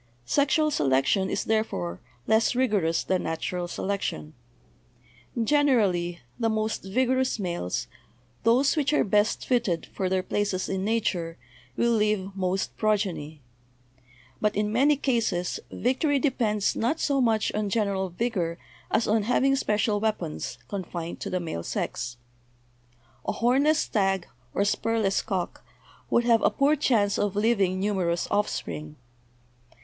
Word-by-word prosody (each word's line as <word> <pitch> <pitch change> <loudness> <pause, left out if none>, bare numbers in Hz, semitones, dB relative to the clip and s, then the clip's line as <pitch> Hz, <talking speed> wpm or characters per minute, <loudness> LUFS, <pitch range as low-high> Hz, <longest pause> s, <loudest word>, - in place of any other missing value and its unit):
Sexual 295 - +2
se 215 - 0
lection 135 +8 +2
is, - - -1
therefore, 90 - -1 0.3
less 220 +2 +3
rigorous 205 -10 +1
than 185 -1 0
natural 175 +2 -3
selection. 190 -4 -3 1.1
Generally, 210 - +2 0.2
the 225 -1 +2
most 220 0 -1
vigorous 255 +6 +1
males, 175 - -2 0.6
those 250 +7 +3
which 300 -1 +1
are - - +4
best 210 +1 +1
fitted 225 -10 +1
for 190 -1 -1
their 185 0 +1
places 200 -2 -1
in 190 0 -2
nature, 195 -6 -1 0.4
will 235 - +3
leave 210 -3 +1
most 190 0 -1
progeny. 190 -9 -1 1.0
But 210 0 +1
in 210 +1 0
many 275 +6 +4
cases 230 -10 0
victory 280 +4 +1
depends 225 -7 +1
not 255 +8 0
so 280 -2 +1
much 225 -3 +2
on 210 -1 -1
gen 215 +1 +1
eral 190 -2 -2
vigor 175 -5 -1 0.3
as 220 +1 +1
on 220 +1 +3
having 265 +5 +2
special 210 -4 +1
weapons, 205 -7 -2
confined 175 -4 -5
to - - -4
the 185 - -1
male 160 - -4
sex. 120 +7 -3 1.1
A - - +1
hornless 275 +6 +3
stag 195 - 0 0.3
or 200 - +2
spurless 215 -1 +1
cock 190 -5 -3 0.5
would 235 - +3
have 230 -2 +4
a - - +4
poor 285 +2 +3
chance 220 -8 +2
of 205 -1 0
leaving 200 -4 +2
numerous 185 -4 0
offspring. 80 - -2
210 Hz, 135 wpm, -26 LUFS, 185-235 Hz, 1.1 s, are